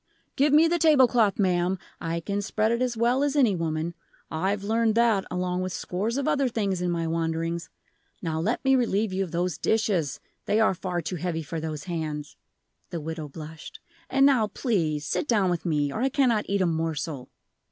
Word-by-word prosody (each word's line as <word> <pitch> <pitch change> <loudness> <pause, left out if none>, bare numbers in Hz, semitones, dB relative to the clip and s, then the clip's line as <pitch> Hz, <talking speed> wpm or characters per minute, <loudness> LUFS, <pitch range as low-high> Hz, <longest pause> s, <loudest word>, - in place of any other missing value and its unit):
"Give 285 +2 +3
me 310 +3 +6
the 345 +1 +1
table 295 -5 +6
cloth, 225 -5 +2
ma'am, 180 -1 +1 0.2
I 165 +1 -3
can 200 +4 -2
spread 215 +2 0
it 235 +1 0
as 245 -2 0
well 240 +4 +2
as 290 0 +1
any 245 -9 +4
woman; 165 0 -2 0.4
I've 195 +5 -1
learned 225 +1 +1
that 230 -4 +3
along 180 0 -1
with 185 -1 -3
scores 210 +9 -2
of 280 - -1
other 275 -2 +2
things, 200 -6 -1
in 180 - 0
my 170 -1 -1
wanderings. 165 +1 -2 0.5
Now 160 -3 -2
let 220 +11 -1
me 270 0 +5
relieve 220 -5 +1
you 195 +1 0
of 185 - -6
those 175 0 -2
dishes; 195 - 0 0.3
they 215 - +2
are 220 - +4
far 180 -1 -3
too 175 +4 -3
heavy 165 -1 -2
for 160 +2 -5
those 155 -2 -5
hands" 155 -4 -4 0.5
the 170 - -4
widow 160 0 -5
blushed; 155 +2 -10 0.3
"and 270 +1 +4
now 255 -6 +4
please, 165 - -1
sit 290 - -1
down 200 -6 +2
with 175 0 -2
me, 145 -3 0
or - - -3
I 265 - +2
cannot 245 -6 +1
eat 200 0 +1
a - - +3
morsel." 160 -4 -2
185 Hz, 200 wpm, -26 LUFS, 165-230 Hz, 0.5 s, me